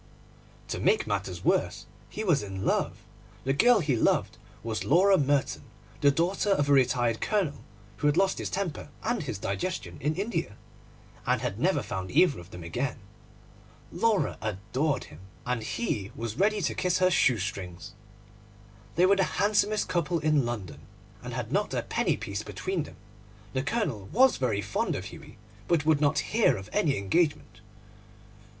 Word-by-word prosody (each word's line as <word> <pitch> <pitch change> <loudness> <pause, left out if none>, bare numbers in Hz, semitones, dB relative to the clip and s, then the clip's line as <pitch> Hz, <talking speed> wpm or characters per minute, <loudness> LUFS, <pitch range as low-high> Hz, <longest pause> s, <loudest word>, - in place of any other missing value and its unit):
To - - -3
make 440 - +2
matters - - -3
worse, - - +1 0.2
he 215 - -5
was 170 -9 +3
in 95 -1 -5
love. - - 0 0.4
The 135 - +1
girl 235 - +5
he 145 -5 +1
loved 110 - +1 0.2
was 110 -1 -2
Laura 190 +6 +5
Merton, 145 -4 +1 0.4
the 145 - +6
daughter 175 +8 +1
of 145 -8 +2
a - - +6
retired 120 -4 +2
Colonel 195 -9 0 0.3
who 145 - +1
had 145 +2 +2
lost 190 0 +2
his - - -3
temper 185 -7 -3
and 240 +2 0
his 130 -9 -4
digestion 100 - -4
in 150 +3 0
India, 180 - -2 0.7
and - - +2
had - - -3
never - - +2
found 95 0 -4
either 145 - +4
of 85 0 -12
them 90 -3 -9
again. 125 +11 -2 0.9
Laura 225 -4 +1
adored 110 +8 -1
him, 75 - -13 0.3
and 125 -2 -1
he 105 - -3
was 115 0 -5
ready 210 +1 +2
to - - 0
kiss 180 -1 +1
her 185 0 +3
shoe 130 -8 +4
strings. 90 -3 -5 1.0
They 175 - +5
were 195 +1 +4
the 195 - +4
handsomest 210 +1 +2
couple 175 0 0
in 150 -5 +2
London, 105 -8 -5 0.4
and - - -6
had - - -4
not - - 0
a - - -1
penny - - 0
piece 100 -2 -4
between 180 - -3
them. - - -12 0.6
The 130 - 0
Colonel 140 - -2
was 260 +3 +5
very 110 -6 0
fond 100 - -1
of - - -5
Hughie, - - -12 0.3
but 160 -4 +2
would 155 -2 +3
not 150 +5 +1
hear 215 - +4
of 95 +2 -9
any 145 -4 +2
engagement. 110 - 0
145 Hz, 170 wpm, -28 LUFS, -, 1.0 s, the